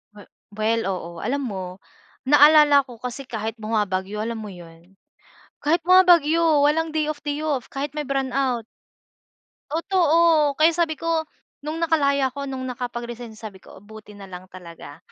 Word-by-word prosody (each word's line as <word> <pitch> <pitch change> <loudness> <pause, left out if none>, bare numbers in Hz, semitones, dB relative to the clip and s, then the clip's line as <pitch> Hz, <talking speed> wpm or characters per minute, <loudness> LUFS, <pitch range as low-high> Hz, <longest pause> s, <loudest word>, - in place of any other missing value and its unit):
We 205 - -12 0.3
well, 220 +2 0
oo. 175 -2 -6
Alam 270 +4 -2
mo, 190 -4 -5 0.6
naalala 295 0 +6
ko 245 -4 -14
kasi 250 +2 -6
kahit 220 -2 -5
bumabagyo 210 -2 -2
alam 225 +1 -3
mo 210 - -8
yun, 175 +2 -15 0.7
kahit 330 +3 +2
bumabagyo, 335 -3 +4
walang 315 +2 +1
day 310 -1 -1
off 305 0 -5
day 290 0 -3
off, 290 -6 -2
kahit 285 +2 -5
may 300 - -2
brownout. 265 -3 -1 1.0
Totoo, 330 -3 +2
kaya 320 +2 +4
sabi 325 -2 -1
ko, 325 -1 -1 0.3
nung 305 +3 -5
nakalaya 280 -5 +1
ako 280 0 -6
nung 260 -1 -5
nakapag-resign 240 -2 -6
sabi 205 -4 -10
ko, - - -15
"Buti 210 -1 -13
na 200 - -10
lang 185 0 -11
talaga. 170 -5 -12
270 Hz, 150 wpm, -22 LUFS, 215-305 Hz, 1.0 s, naalala